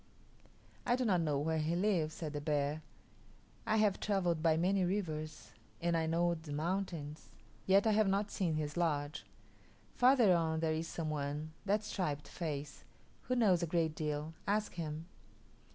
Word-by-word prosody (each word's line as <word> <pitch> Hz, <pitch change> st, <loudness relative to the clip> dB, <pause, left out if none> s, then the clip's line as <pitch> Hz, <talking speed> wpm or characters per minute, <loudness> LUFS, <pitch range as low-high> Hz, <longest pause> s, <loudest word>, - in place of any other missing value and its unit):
"I 245 Hz, -, +2 dB
do 255 Hz, 0 st, -1 dB
not 185 Hz, -6 st, +3 dB
know 150 Hz, -3 st, +1 dB
where 160 Hz, +3 st, 0 dB
he 155 Hz, +2 st, 0 dB
lives," 175 Hz, -5 st, +1 dB
said 155 Hz, -3 st, -5 dB
the 145 Hz, -, -3 dB
bear. 150 Hz, 0 st, 0 dB, 0.9 s
"I 220 Hz, -, +3 dB
have 210 Hz, -3 st, +3 dB
travelled 180 Hz, -6 st, 0 dB
by 160 Hz, -1 st, +3 dB
many 185 Hz, +3 st, +2 dB
rivers 160 Hz, -5 st, -3 dB, 0.3 s
and 170 Hz, 0 st, +1 dB
I 160 Hz, -1 st, +1 dB
know 170 Hz, +1 st, +2 dB
the 160 Hz, -2 st, -8 dB
mountains, 160 Hz, -1 st, -3 dB, 0.4 s
yet 195 Hz, +2 st, +5 dB
I 220 Hz, -, +4 dB
have 215 Hz, -1 st, +3 dB
not 200 Hz, +1 st, 0 dB
seen 170 Hz, -5 st, 0 dB
his 150 Hz, -1 st, -2 dB
lodge. 150 Hz, -4 st, -1 dB, 0.7 s
Farther 245 Hz, -6 st, +5 dB
on 160 Hz, -1 st, +1 dB
there 160 Hz, -1 st, +1 dB
is 160 Hz, +1 st, -2 dB
some 160 Hz, -2 st, -3 dB
one 150 Hz, +1 st, -3 dB, 0.2 s
that 205 Hz, +2 st, +2 dB
striped 155 Hz, -8 st, -3 dB
face 150 Hz, -4 st, -5 dB, 0.4 s
who 255 Hz, -, +1 dB
knows 200 Hz, -8 st, +4 dB
a 170 Hz, -, 0 dB
great 165 Hz, -1 st, +1 dB
deal; 150 Hz, 0 st, -3 dB
ask 210 Hz, +1 st, 0 dB
him." 160 Hz, -1 st, -4 dB
165 Hz, 170 wpm, -34 LUFS, 155-195 Hz, 0.9 s, yet